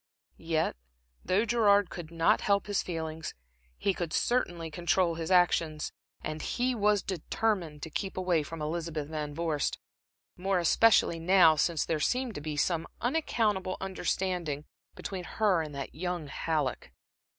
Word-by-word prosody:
Yet 165 -1 0 0.5
though 200 +5 +2
Gerard 205 -4 +4
could 170 -3 -7
not 170 +6 +2
help 200 -1 +2
his 205 -1 0
feelings, 160 -2 -5 0.4
he 195 - +1
could 170 -3 -4
certainly 175 -10 0
control 175 +2 +1
his 165 0 -4
actions, 170 -4 +2 0.3
and 155 0 -4
he 250 +1 0
was 210 -3 +2
determined 180 -3 -2
to 160 - -6
keep 190 +5 -3
away 180 -3 +2
from 155 +1 -6
Elizabeth 155 -1 -3
Van 150 -2 -4
Vorst 160 -3 -1 0.6
more 190 +1 0
especially 175 0 +4
now 170 -2 +6
since 160 +1 +1
there 160 - -1
seemed 250 +7 0
to 145 - -6
be 150 0 -4
some 165 +1 +1
unaccountable 225 -9 0
understanding 180 -5 -2 0.3
between 190 -2 -5
her 195 -2 +1
and 150 -2 -6
that 140 - -5
young 175 0 -3
Halleck. 145 -1 -2
175 Hz, 145 wpm, -30 LUFS, 155-195 Hz, 0.6 s, now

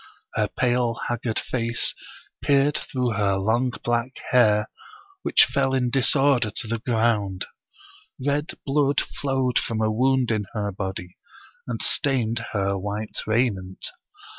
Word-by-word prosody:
Her - - +1
pale, 120 -2 0
haggard 120 -1 -2
face 115 -1 +1 0.5
peered 145 +1 +3
through 125 -5 -1
her 100 -2 +1
long 110 +6 +1
black 120 +2 0 0.2
hair, 105 -4 +4 0.5
which - - +5
fell 135 -1 0
in 125 -2 +1
disorder 135 -2 +4
to 110 +2 -4
the 115 +1 -2
ground. 110 -5 0 0.8
Red 145 +2 -1
blood 140 0 +2
flowed 130 -3 0
from 115 -2 -3
a 110 0 +1
wound 130 +2 +2
in 105 -2 0
her 105 -2 -2
body 95 -2 -5 0.5
and - - -3
stained 120 -5 +1
her 100 -1 0
white 105 +2 -4
raiment. 105 -5 -1
120 Hz, 130 wpm, -24 LUFS, 105-130 Hz, 0.8 s, which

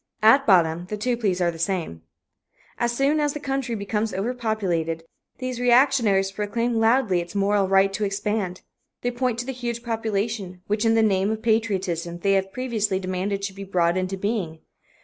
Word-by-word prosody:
At 270 +6 +6
bottom 175 -3 +3
the 210 - -4
two 245 +4 0
pleas 200 -6 -1
are 175 -1 +2
the 165 - -11
same. 170 - -2 0.8
As 240 0 +1
soon 275 +5 +1
as 295 -1 +1
the 295 - -5
country 270 -4 -2
becomes 210 +1 -2
overpopulated, 195 -7 -1 0.3
these 255 -2 -4
reactionaries 240 -6 +4
proclaim 230 +4 -1
loudly 225 -4 +3
its 170 +3 -9
moral 200 0 +2
right 195 0 +3
to 210 - -2
expand. 200 -2 -2 0.4
They 245 - 0
point 245 -1 -1
to - - -8
the 265 - -3
huge 240 -2 -4
population, 215 -5 -3
which 210 +2 0
in 225 0 +4
the 225 - +4
name 195 -2 +2
of 220 0 -3
patriotism 190 -7 0
they 195 +3 +1
have 195 0 0
previously 215 -6 -1
demanded 190 +2 -2
should 195 -1 -6
be 200 - -7
brought 175 -3 +1
into 185 +1 -2
being. 190 -6 -3
205 Hz, 180 wpm, -24 LUFS, 190-235 Hz, 0.8 s, At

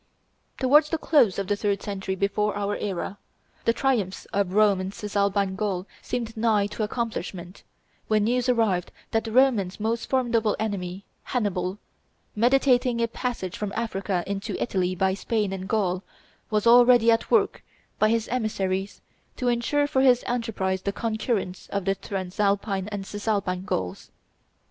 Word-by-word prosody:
Towards 295 +4 +5
the 325 - 0
close 285 - +3
of 195 - -1
the 205 - 0
third 200 -1 -1
century 195 -2 -3
before 200 +2 0
our 205 0 -1
era, 195 0 -4 0.5
the - - +5
triumph 230 -7 0
of 195 -2 0
Rome 205 -3 +4
in 185 +1 -4
Cisalpine 200 -1 0
Gaul 195 -3 -2 0.2
seemed 230 -2 -4
nigh 220 -2 +2
to - - -4
accomplishment, 210 -5 -4 0.5
when 215 -1 +2
news 245 +3 +1
arrived 215 -7 +1 0.2
that 225 0 +1
the 225 - -4
Romans' 225 -7 +3
most 225 +2 -2
formidable 235 -5 +2
enemy, 195 -3 -4 0.2
Hannibal, 190 -5 -1 0.6
meditating 250 +1 +3
a 230 - +2
passage 230 -6 -4
from 210 -2 -4
Africa 195 -5 -1
into 200 +1 -4
Italy 185 -4 0
by 190 +1 +1
Spain 205 0 -1
and 190 0 -6
Gaul, 190 -4 +1 0.5
was 210 0 0
already 240 -1 +7
at 225 0 +1
work, 460 - +2 0.4
by 215 - +4
his 230 0 +1
emissaries, 200 -5 -2 0.4
to 250 -2 0
insure 245 +5 +1
for 265 -2 +1
his 250 -2 +5
enterprise 215 -6 -1
the 200 - -1
concurrence 220 -3 -2
of 200 -2 -3
the 195 - +2
Transalpine 195 +1 -1
and 205 -2 -5
Cisalpine 200 -3 -2
Gauls. 95 - -3
210 Hz, 150 wpm, -25 LUFS, 195-235 Hz, 0.6 s, already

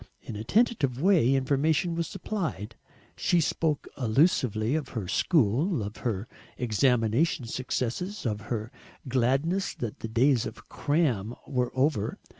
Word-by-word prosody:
In 110 - -7
a 105 - -5
tentative 150 - +1
way 160 -7 +4
information 145 +6 +1
was 170 0 -2
supplied; 155 - -4 0.4
she 175 - +2
spoke 155 -1 0
allusively 125 - +2
of 150 -4 -1
her 100 -5 -3
school, 145 - +2
of 105 +2 -6
her 110 -2 -3 0.3
examination 125 - +2
successes, 130 - -3
of 105 -2 -1
her 110 -1 -3 0.4
gladness 135 +10 +1
that 115 -4 -5
the - - -4
days 120 +2 +2
of 110 - -11
"Cram" 125 - 0
were 125 -3 -1
over. 130 -6 +1
130 Hz, 130 wpm, -28 LUFS, 115-160 Hz, 0.4 s, way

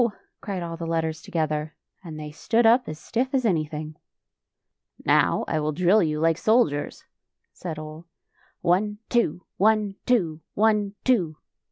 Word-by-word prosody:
cried 195 -4 -4
all 165 -1 -5
the 165 0 -5
letters 160 -1 -1
together, 155 -1 -2 0.3
and 160 -3 -8
they 150 -1 -7
stood 225 +9 +1
up 235 -1 +5
as 155 - -6
stiff 255 - -2
as 255 -2 +1
any 170 -8 +2
thing. 155 0 -7 0.6
" - - -60 0.3
Now - - +3
I 155 - 0
will 155 0 0
drill 180 +6 +4
you 155 -3 0
like 165 +1 +2
soldiers," 215 -11 +1 0.5
said 165 -4 -6
Ole. 155 +2 -9 0.3
" - - -34
One, 195 +4 +1
two; 205 -8 +1
one, 210 -1 +2
two; 170 -11 +1
one, 210 -1 +2
two." 185 -12 +2
170 Hz, 160 wpm, -25 LUFS, 155-215 Hz, 0.6 s, up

